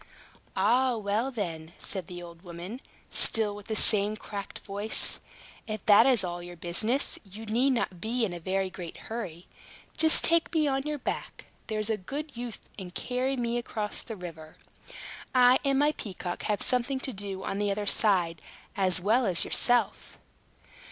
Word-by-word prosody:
"Ah, 240 +5 +3
well, 215 +4 0
then," 170 -9 -5
said 190 -4 -2
the 175 -1 -8
old 170 -1 -12
woman, 180 +7 -8 0.3
still 215 -2 +3
with 205 -1 -11
the 220 - -2
same 210 0 +3
cracked 200 -2 -7
voice, 205 +2 0 0.5
"if 215 -2 -5
that 215 +4 +7
is 250 -6 +4
all 175 -1 -4
your 175 0 -9
business, 215 - 0
you 210 +2 -10
need 235 +5 +2
not 230 -9 -1
be 230 +2 0
in 185 - -4
a 175 - -6
very 190 +2 -1
great 175 -2 -8
hurry. 180 -7 -6 0.5
Just 315 0 +8
take 335 -1 +3
me 310 -2 +3
on 270 -1 +1
your 300 -1 -2
back, - - -5 0.2
there's 215 -1 -1
a 220 - 0
good 280 +9 -6
youth, 240 -2 -7
and 180 -1 -9
carry 255 +2 -1
me 240 0 0
across 215 -3 -4
the 225 - -7
river. 165 -4 -10 0.8
I 250 0 +6
and 275 -1 +2
my 295 +2 +4
peacock 185 -9 -6
have 210 -2 +1
something 255 +1 +1
to 265 - -4
do 195 -1 -4
on 195 - -3
the 205 0 +1
other 205 +1 -1
side, 180 -6 +2 0.3
as 185 -2 +3
well 220 +6 +2
as 180 -3 +3
yourself." 245 -1 +1
210 Hz, 170 wpm, -28 LUFS, 185-245 Hz, 0.8 s, Just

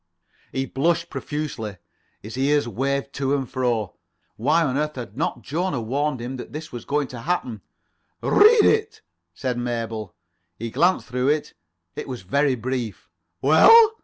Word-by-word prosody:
He 135 0 -1
blushed 165 +5 0
profusely. 130 -9 -4 0.5
His 110 +3 -7
ears 145 +1 +2
waved 140 +5 -2
to 140 0 0
and 135 -2 -2
fro. 120 -6 -1 0.4
Why 150 +9 +2
on 135 -4 0
earth 150 +1 -1
had 120 -5 -7
not 150 - -2
Jona 160 -1 -1
warned 135 +4 -1
him 125 +3 -5
that 125 - -9
this 155 +1 -7
was 120 -2 -7
going 145 -1 0
to 125 - -8
happen? 125 - -2 0.6
"Read 430 +1 +6
it," 435 0 +1 0.3
said 125 -2 -2
Mabel. 115 -5 -4 0.4
He 115 0 -5
glanced 180 +8 +2
through 125 0 -1
it. 150 +1 0 0.4
It - - -5
was 125 -7 -6
very 140 +7 +2
brief. 120 -6 -4 0.3
"Well?" 430 - +8
135 Hz, 155 wpm, -23 LUFS, 120-150 Hz, 0.6 s, Well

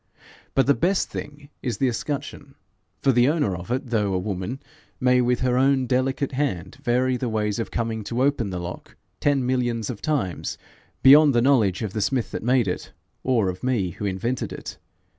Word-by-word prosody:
But 135 - +4
the 140 - +5
best 185 +6 0
thing 145 -1 -8
is 120 -5 -2
the 135 - +2
escutcheon; 140 +2 -4 0.5
for 135 - +5
the 120 0 +4
owner 145 - +1
of 90 +3 -8
it, 125 0 -2
though 105 -4 +1
a - - +2
woman, 95 +6 -3 0.4
may 125 -1 +4
with 125 0 +1
her 125 -1 +2
own 135 -1 +3
delicate 130 +2 0
hand 130 - -2
vary 130 -1 +1
the 125 -1 -2
ways 105 -1 -1
of 115 - -3
coming 115 -2 -2
to 120 +4 -1
open 135 -7 +1
the 90 - -4
lock 90 +1 -7 0.2
ten 140 -3 +2
millions 120 -3 0
of 105 - -9
times, 130 - -2 0.5
beyond 145 0 +8
the 120 - +4
knowledge 110 -9 +3
of 105 -3 -4
the 110 - -1
smith 125 +3 0
that - - -4
made 125 -1 +2
it, 90 - -4 0.3
or 120 -6 +2
of 90 0 -4
me 115 -9 0
who 105 - -6
invented 110 +6 -2
it. - - -8
125 Hz, 195 wpm, -24 LUFS, 105-135 Hz, 0.5 s, beyond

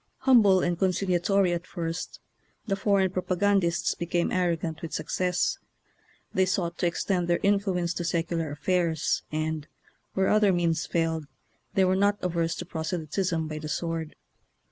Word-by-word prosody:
Humble 220 -8 +6
and 175 -1 -1
conciliatory 185 0 +2
at 170 +1 -4
first, 165 -1 -5 0.5
the 195 - 0
for 200 0 +2
eign 190 -1 +1
propagandists 185 -1 +1
became 170 0 -1
arrogant 170 -3 -1
with 165 - -6
success. 180 -1 0 0.7
They 190 0 +3
sought 175 -2 -1
to 175 - +2
extend 175 +1 -1
their 175 0 +3
in 200 0 +4
fluence 180 -4 -1
to 175 - -2
secular 165 -1 -1
affairs, 160 +1 0
and, 155 -1 -2 0.5
where 190 0 +2
oth 215 - +4
er 205 -2 +5
means 170 -2 0
failed, 160 -2 -1 0.5
they 190 - +4
were 185 0 +2
not 200 +1 +2
averse 170 -2 0
to 180 - -6
proselytism 165 0 -2
by 155 0 -5
the 155 0 -6
sword. 165 0 -3
175 Hz, 155 wpm, -27 LUFS, 165-190 Hz, 0.7 s, Humble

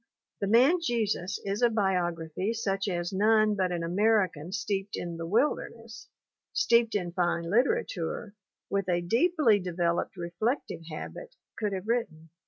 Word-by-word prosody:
The 200 - -1
Man 255 - +5
Jesus 215 - -1
is 200 +2 -2
a 240 - +5
biography 185 -2 -1
such 195 -3 -1
as 175 0 -2
none 215 +2 +4
but 185 -3 0
an 170 -1 -2
American 185 -3 +1
steeped 200 -1 -2
in 170 -1 -5
the 165 0 -5
wilderness, 230 - -1 0.5
steeped 235 - +3
in 180 -4 -1
fine 175 -1 0
literature, 205 -1 0 0.3
with 195 -2 -1
a 175 -1 +2
deeply 235 - +3
developed 175 0 -1
reflective 175 - -2
habit 480 - -8 0.2
could 210 -2 -2
have 190 +2 -5
written. 165 -10 -2
200 Hz, 140 wpm, -28 LUFS, 175-230 Hz, 0.5 s, Man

